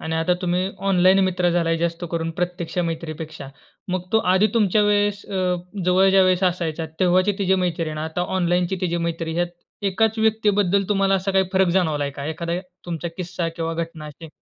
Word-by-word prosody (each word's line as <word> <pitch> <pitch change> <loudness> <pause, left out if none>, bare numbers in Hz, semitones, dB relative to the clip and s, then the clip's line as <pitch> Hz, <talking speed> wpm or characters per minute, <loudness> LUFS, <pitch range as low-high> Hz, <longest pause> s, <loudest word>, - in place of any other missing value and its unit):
आणि 160 - -3
आता 170 +2 +2
तुम्ही 180 +1 0 0.2
ऑनलाईन 185 0 +5
मित्र 180 -1 +1
झालाय, 165 -1 +1
जास्त 170 +1 -2
करून 165 -1 -2
प्रत्यक्ष 180 0 -3
मैत्रीपेक्षा. 155 -3 -6 0.4
मग 185 -1 -1
तो 220 - +5
आधी 190 +3 +4
तुमच्या 210 -2 +3
वेळेस 205 0 +1
अ, 195 - -7 0.5
जवळच्या 190 +1 +5
वेळेस 185 0 +2
असायचा, 170 -3 -1
तेव्हाची 185 +2 +3
तिची 190 -1 +2
मैत्री 165 -2 -1
आणि 155 - -5
आता 160 +2 -3 0.2
ऑनलाईनची 175 +1 +1
तिची 175 -2 0
मैत्री, 165 -1 -4
यात 175 - +2 0.4
एकाच 220 +3 +1
व्यक्तीबद्दल 205 -3 +2
तुम्हाला 195 -1 +2
असा 195 +1 0
काही 190 0 +3
फरक 190 -1 +3
जाणवलाय 150 -5 0
का? 140 0 -7
एखादा 170 +2 -3 0.3
तुमचा 170 0 -3
किस्सा 180 -2 -3
किंवा 165 0 -2
घटना 165 -2 -5
अशी? 155 +2 -11
180 Hz, 175 wpm, -22 LUFS, 165-190 Hz, 0.5 s, ऑनलाईन